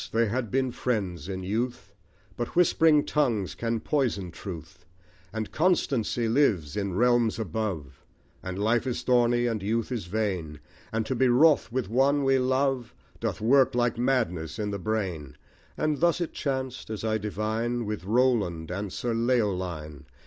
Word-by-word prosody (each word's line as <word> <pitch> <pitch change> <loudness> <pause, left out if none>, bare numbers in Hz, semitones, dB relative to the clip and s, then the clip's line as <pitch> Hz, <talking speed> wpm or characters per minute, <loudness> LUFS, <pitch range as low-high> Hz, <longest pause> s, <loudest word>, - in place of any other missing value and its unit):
they 115 0 +2
had 120 0 -2
been 130 +1 0
friends 95 - -2
in 95 -1 -4
youth; 110 0 -3 0.4
But 120 +1 -4
whispering 160 -3 +4
tongues 120 -11 0
can 115 -1 -2
poison 120 - -1
truth; 85 -1 -9 0.5
And 110 -1 -4
constancy 135 - +1
lives 110 - +2
in 100 -3 -2
realms 120 0 +3
above; 90 - -4 0.4
And 95 0 -5
life 115 +5 +1
is 125 - -2
thorny; 120 -1 +3
and 115 -4 -1
youth 115 +4 -1
is 115 -7 -3
vain; 90 -7 -2 0.3
And 110 0 -1
to - - -1
be 130 +1 +3
wroth 140 +3 +4
with 125 -4 -1
one 135 +6 +2
we 135 0 +3
love, 130 -1 0 0.2
Doth - - -3
work 130 +3 +4
like 120 -1 +1
madness 90 -12 0
in 105 -1 -2
the 100 - -3
brain. 90 -9 -3 0.4
And 155 -2 0
thus 170 0 +3
it 170 - -3
chanced, 130 -4 -3
as 110 -2 -5
I 110 0 0
divine, 110 +3 -2
With 105 -1 -4
Roland 105 -7 +1
and 100 +1 -4
Sir 120 +4 -2
Leoline. 95 - -1
115 Hz, 155 wpm, -27 LUFS, 95-130 Hz, 0.5 s, whispering